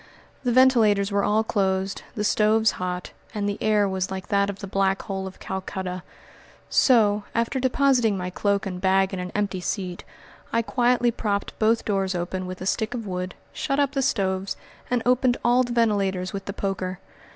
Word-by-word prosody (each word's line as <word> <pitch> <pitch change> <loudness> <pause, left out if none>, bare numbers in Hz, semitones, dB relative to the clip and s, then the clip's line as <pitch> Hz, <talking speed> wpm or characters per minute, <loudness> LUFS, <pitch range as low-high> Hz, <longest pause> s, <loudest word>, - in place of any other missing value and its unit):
The 245 - +1
ventilators 225 -6 +4
were 200 0 +1
all 215 +1 +2
closed, 195 -2 0
the 210 - -1
stoves 215 +1 +3
hot, 180 0 -4 0.2
and 205 -1 -1
the 205 - -3
air 210 -2 +3
was 190 -1 -2
like 190 0 -6
that 200 -1 +2
of 200 - -4
the 200 - -7
Black 195 0 0
Hole 190 -1 -4
of 190 - -11
Calcutta. 190 -1 -4 0.7
So, 210 -5 +4
after 230 +3 0
depositing 255 -5 +2
my 180 0 -4
cloak 200 +1 0
and 180 -2 -5
bag 190 0 +3
in 190 - -3
an 180 0 -5
empty 200 -3 -1
seat, 180 -1 -3 0.5
I 230 - +1
quietly 245 0 +2
propped 205 -3 -2
both 225 +1 +2
doors 195 -2 0
open 180 +1 -3
with 185 0 -7
a - - -4
stick 220 +4 -1
of 230 -3 -5
wood, 185 -1 -4 0.2
shut 275 -1 -1
up 280 -1 +2
the 275 -1 -1
stoves, 195 -5 0 0.3
and 245 -2 0
opened 250 0 +3
all 245 +1 +5
the 245 -1 -2
ventilators 195 -5 +1
with 195 -1 -5
the 200 - -4
poker. 190 -2 -3
200 Hz, 185 wpm, -24 LUFS, 190-230 Hz, 0.7 s, all